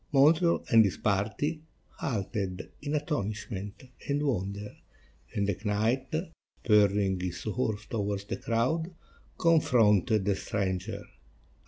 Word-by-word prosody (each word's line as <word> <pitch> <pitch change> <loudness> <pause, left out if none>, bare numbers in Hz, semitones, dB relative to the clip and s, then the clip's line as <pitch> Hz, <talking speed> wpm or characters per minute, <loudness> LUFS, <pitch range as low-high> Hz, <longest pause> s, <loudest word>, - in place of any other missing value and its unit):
Montreal 160 +5 +4
and 115 -2 +8
his 100 - -1
party 110 +10 0 0.4
halted 100 -5 -3
in 145 +1 -2
astonishment 105 - -3 0.3
and 145 +1 +1
wonder, 100 -4 -2 0.6
and 100 -1 +1
the 100 - +1
knight, 110 +5 +1 0.6
spurring 100 -3 +3
his 90 -1 -4
horse 110 -1 -2
towards 100 -3 -2
the - - -4
crowd, 160 +10 -1 0.4
confronted 110 - +4
the 100 -1 +2
stranger. 95 -2 -3
105 Hz, 110 wpm, -29 LUFS, 100-135 Hz, 0.6 s, and